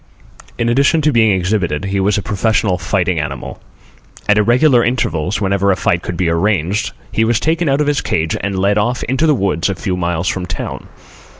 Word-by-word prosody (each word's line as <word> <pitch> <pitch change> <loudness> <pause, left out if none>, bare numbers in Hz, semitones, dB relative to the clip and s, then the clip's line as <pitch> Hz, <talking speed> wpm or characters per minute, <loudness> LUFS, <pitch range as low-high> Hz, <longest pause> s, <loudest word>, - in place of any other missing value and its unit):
In 115 - 0
addition 140 +6 +3
to 150 0 +2
being 110 -4 +3
exhibited 90 -3 -1
he 95 0 -1
was 100 +2 +1
a 100 - -2
professional 100 -2 0
fighting 90 0 0
animal. 75 -1 -6 0.7
At 105 0 +4
irregular 120 +3 +4
intervals, 100 -7 -1
whenever 100 -1 +1
a - - +2
fight 85 -1 0
could 90 -1 -5
be 90 - 0
arranged, 100 +4 0 0.2
he 110 - +1
was 110 0 +1
taken 160 +2 0
out 135 +2 +2
of - - +1
his 145 -1 0
cage 80 0 -1
and 100 0 -2
led 100 +2 +2
off 120 +4 -1
into 135 +6 0
the 150 - +4
woods 95 -5 0
a 100 - -2
few 90 +2 -3
miles 85 -1 -2
from 90 -2 -2
town. 85 - -6
100 Hz, 200 wpm, -16 LUFS, 90-120 Hz, 0.7 s, At